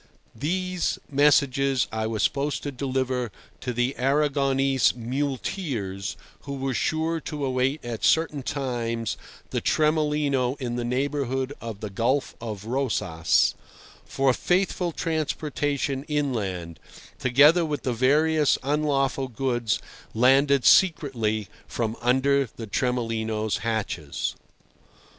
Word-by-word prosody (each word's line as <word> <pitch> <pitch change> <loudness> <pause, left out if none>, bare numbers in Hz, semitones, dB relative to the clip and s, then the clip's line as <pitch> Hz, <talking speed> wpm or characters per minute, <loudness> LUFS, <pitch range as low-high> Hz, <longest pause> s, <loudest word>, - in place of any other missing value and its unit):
These 180 +7 -1
messages 140 -2 +3
I 110 0 -1
was 110 -1 -1
supposed 140 +1 0
to 145 - -3
deliver 130 -3 -2 0.3
to 125 - -3
the 125 +2 0
Arragonese 135 -2 +2
muleteers 125 - -3 0.2
(who 140 0 -6
were 135 -1 -2
sure 160 +5 0
to 150 -2 -4
await 130 +2 0
at 115 -2 -5
certain 160 -3 +2
times 120 -5 -2 0.4
the - - -1
Tremolino 150 -4 +1
in 120 -3 -3
the 120 - -2
neighbourhood 135 +1 -1
of 115 -3 -7
the 105 -2 -5
Gulf 125 +7 0
of 105 -3 -6
Rosas), 105 - +1 0.5
for 135 -1 +1
faithful 180 +2 0
transportation 145 -4 -2
inland, 105 - -2 0.4
together 145 +7 +5
with 150 -2 -3
the 125 - 0
various 150 +5 +3
unlawful 140 -2 0
goods 120 -3 -1 0.4
landed 135 +3 +4
secretly 120 - +3 0.2
from 115 -1 -2
under 130 +2 +2
the 115 - -6
Tremolino's 110 -2 -1
hatches. 105 -10 -3
135 Hz, 110 wpm, -25 LUFS, 115-145 Hz, 0.5 s, together